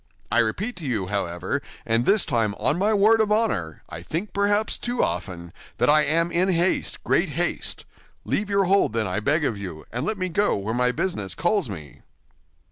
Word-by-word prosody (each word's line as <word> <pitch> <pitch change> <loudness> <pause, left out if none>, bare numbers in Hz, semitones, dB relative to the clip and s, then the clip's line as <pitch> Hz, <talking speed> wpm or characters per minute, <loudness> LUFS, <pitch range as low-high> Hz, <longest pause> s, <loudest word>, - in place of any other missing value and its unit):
I 120 - +3
repeat 185 - -1
to 170 - -7
you, 110 -7 -1
however, 95 +5 -2 0.2
and 115 +1 +1
this 200 -1 +4
time 115 -5 0
on 155 - 0
my 205 +3 +2
word 220 +2 +4
of 210 -1 0
honor—I 90 - -1
think 165 - -4
perhaps 205 +1 +1
too 245 0 -1
often—that 90 +8 -2
I 150 0 +6
am 165 +3 +2
in 180 +3 +3
haste, 175 0 +1
great - - +2
haste. - - -1 0.4
Leave 205 0 -1
your 200 -1 +2
hold, 195 - +2
then, 115 -1 0
I 95 +2 -2
beg 150 +8 +1
of 110 -6 -2
you, 90 -6 -8
and 120 +3 -3
let 215 +6 -1
me 185 -1 -2
go 205 +5 +1
where 100 +3 -3
my 125 +1 +2
business 105 - -3
calls 175 - 0
me." 80 -7 -9
150 Hz, 190 wpm, -24 LUFS, -, 0.4 s, I